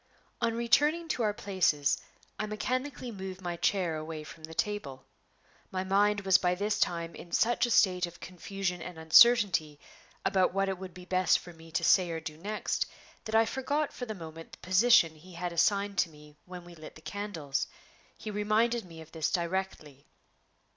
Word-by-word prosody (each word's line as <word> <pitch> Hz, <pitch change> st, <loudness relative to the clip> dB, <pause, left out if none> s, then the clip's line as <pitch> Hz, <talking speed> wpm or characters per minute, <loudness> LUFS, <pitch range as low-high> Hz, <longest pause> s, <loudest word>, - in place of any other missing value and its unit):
On 230 Hz, -1 st, +1 dB
returning 290 Hz, +8 st, +2 dB
to 250 Hz, -, -1 dB
our 215 Hz, -2 st, +2 dB
places, 175 Hz, -9 st, +1 dB, 0.4 s
I 215 Hz, -, -1 dB
mechanically 255 Hz, +4 st, -3 dB
moved 190 Hz, -2 st, -7 dB
my 175 Hz, -2 st, -4 dB
chair 175 Hz, -2 st, 0 dB
away 155 Hz, 0 st, -6 dB
from 155 Hz, +1 st, -10 dB
the 160 Hz, +1 st, -11 dB
table. 160 Hz, -11 st, -3 dB, 0.6 s
My 185 Hz, 0 st, -2 dB
mind 205 Hz, +2 st, +2 dB
was 190 Hz, -2 st, +5 dB
by 180 Hz, 0 st, +1 dB
this 205 Hz, +3 st, -1 dB
time 170 Hz, -1 st, 0 dB
in 170 Hz, -, -11 dB
such 240 Hz, +1 st, +2 dB
a -, -, -4 dB
state 185 Hz, -5 st, +3 dB
of 170 Hz, -, -13 dB
confusion 180 Hz, 0 st, -4 dB
and 180 Hz, 0 st, -8 dB
uncertainty 160 Hz, -3 st, +5 dB, 0.5 s
about 190 Hz, -2 st, +2 dB
what 195 Hz, 0 st, +1 dB
it 190 Hz, -2 st, -3 dB
would 185 Hz, -1 st, -8 dB
be 180 Hz, 0 st, -10 dB
best 185 Hz, -2 st, +3 dB
for 175 Hz, -, -11 dB
me 165 Hz, 0 st, -15 dB
to -, -, 0 dB
say 180 Hz, +1 st, +4 dB
or 165 Hz, -1 st, -3 dB
do 155 Hz, -1 st, -7 dB
next, 205 Hz, +7 st, -2 dB, 0.4 s
that 220 Hz, 0 st, -2 dB
I 225 Hz, 0 st, +6 dB
forgot 280 Hz, +5 st, -1 dB
for 245 Hz, -, -6 dB
the 215 Hz, -, -4 dB
moment 165 Hz, -2 st, -10 dB
the -, -, -10 dB
position 185 Hz, -3 st, +4 dB
he 170 Hz, +4 st, -15 dB
had 175 Hz, 0 st, -4 dB
assigned 200 Hz, +3 st, +1 dB
to 170 Hz, -, +2 dB
me 150 Hz, -1 st, -16 dB
when 180 Hz, -1 st, -9 dB
we 175 Hz, -, -12 dB
lit 155 Hz, -2 st, -11 dB
the 155 Hz, -, -14 dB
candles. 165 Hz, -9 st, -3 dB, 0.5 s
He 215 Hz, -, -6 dB
reminded 215 Hz, +3 st, +1 dB
me 165 Hz, -2 st, -11 dB
of 160 Hz, 0 st, -14 dB
this 160 Hz, -1 st, -1 dB
directly. 170 Hz, -6 st, -3 dB
185 Hz, 190 wpm, -30 LUFS, 165-210 Hz, 0.6 s, I